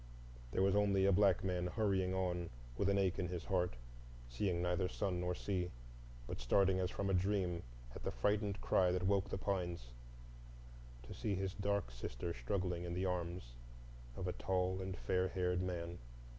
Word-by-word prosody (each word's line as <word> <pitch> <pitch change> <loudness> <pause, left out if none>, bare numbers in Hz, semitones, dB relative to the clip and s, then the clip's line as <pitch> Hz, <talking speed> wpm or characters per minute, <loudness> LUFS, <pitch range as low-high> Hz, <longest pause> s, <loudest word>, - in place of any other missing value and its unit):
There 95 - +1
was 100 0 +4
only 100 -2 +4
a 100 - +5
black 95 -1 +4
man 90 -2 0
hurrying 95 -2 +1
on 90 -2 -1 0.3
with 100 +8 +2
an 100 - +3
ache 95 -1 +2
in 90 - 0
his 90 -1 -4
heart, 90 -6 +1 0.5
seeing 85 +8 0
neither 90 +1 +1
sun 95 -2 -1
nor 90 0 0
sea, 90 -2 -1 0.6
but - - -5
starting 95 +9 +4
as 90 -1 +1
from 100 - -2
a 95 - +2
dream 90 -2 +1 0.3
at - - -7
the - - -1
frightened 100 - 0
cry 90 -1 +4
that 90 0 0
woke 100 0 +2
the - - -2
pines, 90 -10 -2 1.1
to - - -8
see 105 -2 -1
his 95 0 -2
dark 100 -9 0
sister - - -4
struggling 90 +7 -1
in 85 0 -3
the 90 +1 0
arms 85 -7 -2 0.6
of 90 - -3
a 90 - -1
tall 95 0 0
and 95 0 -4
fair 95 0 +1
haired 90 -1 0
man. 85 -2 -3
90 Hz, 180 wpm, -38 LUFS, 90-95 Hz, 1.1 s, a